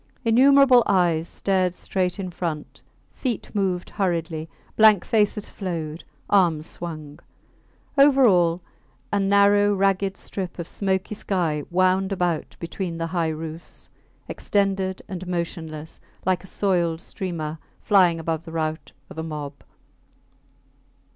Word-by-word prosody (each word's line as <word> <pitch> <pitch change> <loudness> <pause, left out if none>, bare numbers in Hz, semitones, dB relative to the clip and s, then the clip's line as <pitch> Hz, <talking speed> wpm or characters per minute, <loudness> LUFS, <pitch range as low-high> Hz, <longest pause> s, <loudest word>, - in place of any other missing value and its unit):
Innumerable 260 +2 +6
eyes 175 -4 +2
stared 185 -2 0
straight 180 -1 -2
in 185 -2 -5
front, 165 -4 -5 0.3
feet 245 -6 -4
moved 190 -4 -1
hurriedly, 165 -5 -2 0.3
blank 215 -4 +6
faces 210 -1 +1
flowed, 165 -4 -5 0.2
arms 170 -6 +3
swung. 155 -4 -7 0.8
Over 275 -2 +6
all, 175 -4 +3 0.5
a 205 - +3
narrow 200 +1 +4
ragged 195 0 +1
strip 185 -3 -6
of 170 -2 -5
smoky 190 0 -2
sky 170 -8 -1
wound 185 +2 +2
about 175 -4 -1
between 170 0 -4
the 165 - -2
high 170 -2 +1
roofs, 160 +1 -7 0.4
extended 195 -2 -1
and 185 -1 -6
motionless, 165 -3 -5 0.3
like 185 0 +1
a - - -10
soiled 175 -5 0
streamer 165 -5 -5 0.2
flying 180 -5 +4
above 160 0 -2
the 165 - -10
rout 160 0 -3
of - - -9
a - - -3
mob. 150 -3 -5
180 Hz, 120 wpm, -24 LUFS, 165-195 Hz, 0.8 s, Innumerable